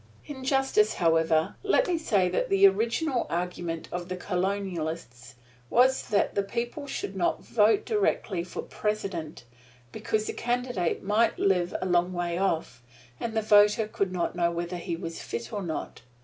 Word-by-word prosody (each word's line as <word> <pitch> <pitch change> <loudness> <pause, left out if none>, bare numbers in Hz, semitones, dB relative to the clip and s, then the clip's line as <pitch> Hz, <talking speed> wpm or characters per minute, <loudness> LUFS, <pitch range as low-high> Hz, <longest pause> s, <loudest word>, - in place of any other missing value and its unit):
In 270 -3 -8
justice, 270 +11 +2
however, 160 -1 +2
let 415 +5 +3
me 360 - +1
say 200 -12 +2
that 180 - -1
the 195 0 +5
original 235 +7 +2
argument 175 -1 -3
of 175 0 -5
the 185 - -2
Colonists 175 - -3 0.3
was 260 +2 +4
that 205 -3 +2
the 200 - +1
people 240 +8 -4
should 195 -7 -4
not 180 -2 0
vote 225 - +3
directly 230 - 0
for 180 - -6
President, 195 - -4 0.5
because 215 +8 -1
the - - -3
candidate 245 -7 -1
might 210 +4 +2
live 180 -3 +1
a - - -2
long 180 0 +2
way 175 -1 -2
off, 160 -10 -1 0.4
and 225 -1 -3
the 220 - +1
voter 210 +1 +5
could 200 -3 -2
not 180 -1 -2
know 170 -1 +2
whether 170 +1 -3
he 170 -1 -3
was 165 0 -6
fit 115 0 -6
or 205 - -2
not. 170 -4 -5
190 Hz, 165 wpm, -27 LUFS, 170-225 Hz, 0.5 s, the